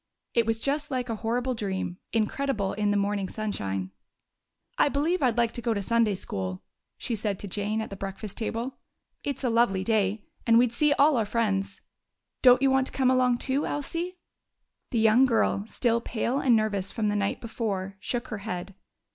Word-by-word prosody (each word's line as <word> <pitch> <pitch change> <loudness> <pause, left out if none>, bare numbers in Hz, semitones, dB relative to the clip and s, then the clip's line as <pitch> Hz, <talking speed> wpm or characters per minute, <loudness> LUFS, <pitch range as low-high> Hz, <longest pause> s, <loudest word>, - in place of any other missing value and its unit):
It 230 -2 +2
was 225 0 +1
just 290 +4 -1
like 250 -2 -2
a 225 - -2
horrible 245 +4 -1
dream, 190 -5 -3
incredible 225 -2 0
in 205 0 0
the 205 - +2
morning 200 -1 0
sunshine. 95 - -3 0.9
"I - - +5
believe 310 +6 0
I'd 245 -4 +2
like 235 -1 +3
to 240 - -6
go 230 -2 0
to 200 - -1
Sunday 230 -1 +2
school," 95 - -4 0.3
she 240 - -3
said 210 -2 -1
to 205 - -7
Jane 210 +3 -1
at 220 - -6
the - - -5
breakfast 195 +1 -6
table. 230 +3 -3 0.4
"It's 280 -1 -3
a 250 - +2
lovely 225 -5 +3
day, 210 -1 +1 0.2
and 230 0 +6
we'd 240 -1 +4
see 300 +4 +3
all 285 -1 +4
our 225 - +2
friends. 200 -3 -1 0.6
Don't 250 0 +7
you 270 - +5
want 265 0 +3
to - - -9
come 260 -1 +3
along 250 -1 +3
too, 275 +4 -1
Elsie?" 335 +5 -3 0.7
The 240 - -1
young 225 +4 +5
girl, 225 -4 +1
still 235 0 +1
pale 240 +3 -1
and 250 -4 +4
nervous 205 -3 0
from 215 -3 0
the 205 - 0
night 200 -1 0
before, 200 -4 -3
shook 240 +4 -3
her 220 - -4
head. 195 -2 -5
225 Hz, 190 wpm, -27 LUFS, 200-250 Hz, 0.9 s, Don't